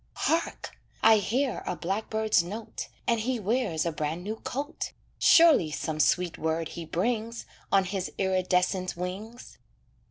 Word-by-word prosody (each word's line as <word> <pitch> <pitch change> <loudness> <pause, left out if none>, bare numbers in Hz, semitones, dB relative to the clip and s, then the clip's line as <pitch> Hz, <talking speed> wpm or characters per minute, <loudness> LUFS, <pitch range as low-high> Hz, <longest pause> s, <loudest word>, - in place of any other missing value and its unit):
Hark! 330 +1 -1 0.3
I 220 0 +8
hear 245 +5 0
a 180 - -1
blackbird's 215 +3 +1
note, 215 +5 -6 0.2
And 235 -1 +2
he 245 +2 -1
wears 205 -6 0
a 170 - 0
brand 155 +3 -3
new 215 +3 -4
coat; 285 +7 -4 0.3
Surely 325 - +6
some 155 0 -3
sweet 175 +2 +2
word 160 +1 -1
he 170 -1 -7
brings, 225 +7 -2 0.3
On 195 -1 +4
his 190 0 -3
iridescent 185 -1 +1
wings. 200 +7 -7
195 Hz, 135 wpm, -28 LUFS, 175-230 Hz, 0.3 s, I